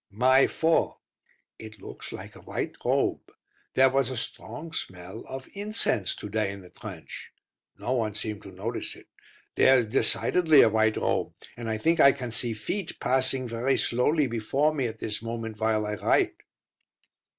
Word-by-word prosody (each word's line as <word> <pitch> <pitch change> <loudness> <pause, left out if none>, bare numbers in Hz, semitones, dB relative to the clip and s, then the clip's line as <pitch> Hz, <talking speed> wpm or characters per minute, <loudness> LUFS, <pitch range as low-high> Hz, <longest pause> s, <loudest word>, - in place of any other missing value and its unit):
May 130 +6 +4
4. 165 0 +1 0.6
It 110 -1 -10
looks - - -8
like - - -9
a - - -13
white - - -4
robe. - - 0 0.4
There 130 0 +6
was 135 -1 +2
a 130 - -4
strong 120 +7 -6
smell 95 +4 -6
of 130 0 -7
incense 205 - -1
to - - -7
day 105 -1 -1
in 100 0 -9
the 90 - -15
trench. - - -9 0.5
No - - -4
one 110 -5 0
seemed 105 -1 -4
to 100 - -11
notice 105 +6 -4
it. - - -16 0.5
There 130 0 +6
is 120 - +2
decidedly 155 +7 +5
a - - +5
white 110 0 +2
robe, - - -1 0.2
and 120 -1 -5
I 110 - -1
think 165 +9 +2
I 140 -2 +8
can 125 -4 -6
see 115 0 0
feet, 185 - -4
passing 130 0 +1
very 120 +3 0
slowly 145 +5 +2
before 135 +6 +1
me 135 -5 0
at 110 0 -7
this 105 -1 -4
moment 115 -1 -5
while 110 -1 +1
I 105 - -2
write. 100 - +1
115 Hz, 175 wpm, -27 LUFS, 110-135 Hz, 0.6 s, I